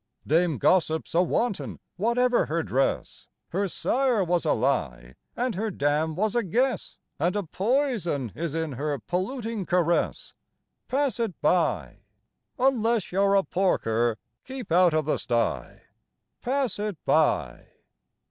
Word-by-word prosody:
Dame 165 -1 +2
Gossip's 160 - +1
a 170 - +4
wanton, 205 +4 -1 0.2
whatever 240 +4 +2
her 165 +2 -1
dress; 135 -1 -1 0.2
Her 195 +3 0
sire 245 +2 +1
was 175 -1 0
a 155 - +3
lie 65 - -1 0.2
and 245 0 -1
her 215 +3 -2
dam 155 -2 0
was 210 +3 0
a 240 - +3
guess, 235 +4 -1 0.2
And 175 +6 +1
a 205 - 0
poison 190 - -1
is 165 -2 -4
in 160 -2 -2
her 145 +3 -2
polluting 205 - -3
caress; 175 -1 0 0.5
Pass 270 -1 0
it 225 -7 -2
by! 175 +3 +1 0.6
Unless 235 -5 +1
you're 195 +2 +3
a 195 - +4
porker, 120 - +1 0.3
keep 260 -8 -8
out 175 -1 +5
of 155 -2 +1
the 155 - +1
sty. 120 -1 -2 0.6
Pass 255 -5 -1
it 210 -4 -3
by! 145 - +1
180 Hz, 135 wpm, -26 LUFS, 155-230 Hz, 0.6 s, out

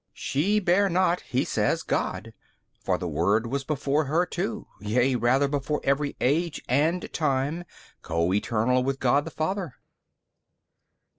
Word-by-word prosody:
B. - - -54
She 195 +10 +1
bare 195 +1 +3
not 180 0 +2
(he 130 +2 -1
says) - - 0
God: - - -2 0.5
for - - 0
the - - -4
Word 100 +7 +1
was 135 +4 -2
before 145 +1 0
her 160 +6 +1
too, 210 +6 -4
yea 120 +5 +1
rather 125 +4 +2
before 145 +1 -1
every 140 +1 0
age 155 +5 +1
and 155 +7 +1
time, 150 +3 0 0.4
Co 85 +3 0
eternal 115 +5 +1
with 135 +1 -2
God 135 +3 +2
the - - -5
Father. 165 -1 -3
140 Hz, 145 wpm, -26 LUFS, 125-170 Hz, 0.5 s, bare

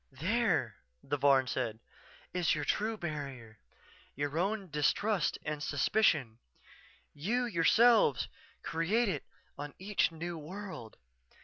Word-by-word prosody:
"There," 175 - +1 0.3
the 145 - -1
Varn 135 -1 +4
said, 115 -2 -2 0.6
"_is 175 -3 +2
your 150 -1 -3
true 220 +1 0
barrier 135 - -6 0.6
your 145 +3 -2
own 195 -1 -1
distrust 195 +7 +1
and 150 -1 -3
suspicion. 140 - +2 0.7
You, 225 +12 0
yourselves, 220 - +4 0.4
create 205 +8 +1
it 150 -7 -3 0.3
on 145 0 -6
each 195 -1 +1
new 165 +1 -5
world. 180 - -8
160 Hz, 110 wpm, -32 LUFS, 140-205 Hz, 0.7 s, Varn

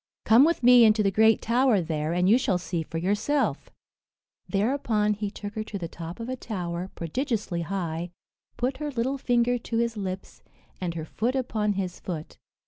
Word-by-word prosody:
"Come 235 +5 +7
with 335 -5 0
me 245 0 +8
into 215 -1 +5
the 195 - +2
great 220 +2 +4
tower 240 -2 +3
there, 155 -2 -2
and 180 +1 +2
you 225 +6 +5
shall 195 -7 +1
see 175 -1 -3
for 160 +1 -6
yourself." 210 - 0 0.8
Thereupon 210 -1 +1
he 210 0 -3
took 205 0 -7
her 215 - -3
to 210 - -5
the 175 -3 -4
top 165 +2 -8
of 230 - -5
a 255 - -2
tower, 180 -6 -4
prodigiously 205 - -2
high, 170 -1 -3 0.5
put 255 +2 -1
her 300 +1 -3
little 265 +1 -1
finger 245 -1 +2
to 230 -1 -3
his 235 0 0
lips, 190 -2 -6 0.4
and 170 -2 -2
her 160 -2 -4
foot 235 - -2
upon 220 -5 0
his 185 -2 -4
foot. 165 -4 -6
210 Hz, 185 wpm, -26 LUFS, 180-240 Hz, 0.8 s, me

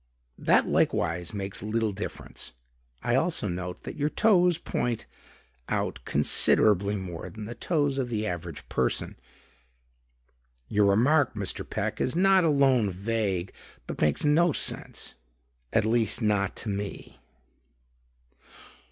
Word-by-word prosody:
"That - - +4
likewise 85 +2 +1
makes 100 -2 -4
little 110 +1 0
difference. 95 - -7 0.5
I 120 - 0
also 160 -3 +1
note 90 0 -5
that - - -7
your 150 0 +1
toes 180 -4 +4
point 120 -8 -2 0.6
out - - -1
considerably 100 -1 +3
more 90 -4 -6
than 110 -1 -8
the 115 - -6
toes 145 -2 0
of 125 -2 -1
the 110 -2 -1
average 85 -4 -5
person." 65 -1 -1 1.5
"Your 105 0 +3
remark, 125 +7 +3
Mr. 100 -4 -3
Peck, - - -2
is 130 - 0
not 190 +1 +5
alone 135 -8 +3
vague, 95 -1 -2 0.3
but - - -6
makes 75 - +2
no 160 +4 +4
sense; - - -4 0.6
at 110 - +2
least 115 0 +2
not 105 -4 +1
to 110 - -4
me." 100 0 -5
110 Hz, 125 wpm, -27 LUFS, 100-140 Hz, 1.5 s, not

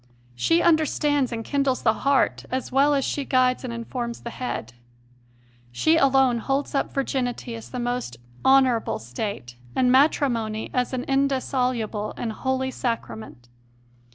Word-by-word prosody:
She 330 - +2
understands 295 -4 +2
and 225 -1 -4
kindles 275 -2 0
the 220 - +4
heart 275 0 +2
as 260 +1 -3
well 280 +3 +4
as 275 - 0
she 285 - -2
guides 255 -1 +2
and 250 - -4
informs 235 0 -5
the 235 - -6
head. 175 - -5 1.0
She 315 - +3
alone 270 -5 +4
holds 275 +4 -2
up 275 - 0
virginity 255 -3 -2
as 225 -1 -8
the 250 - -6
most 245 - -3 0.3
honourable 265 -4 +3
state 120 - -6 0.2
and 250 -1 +3
matrimony 240 -6 +2
as 250 -1 0
an 250 -1 -2
indissoluble 255 -5 -1
and 230 - -3
holy 260 +2 -1
Sacrament. 220 - -5
255 Hz, 140 wpm, -24 LUFS, 230-270 Hz, 1.0 s, the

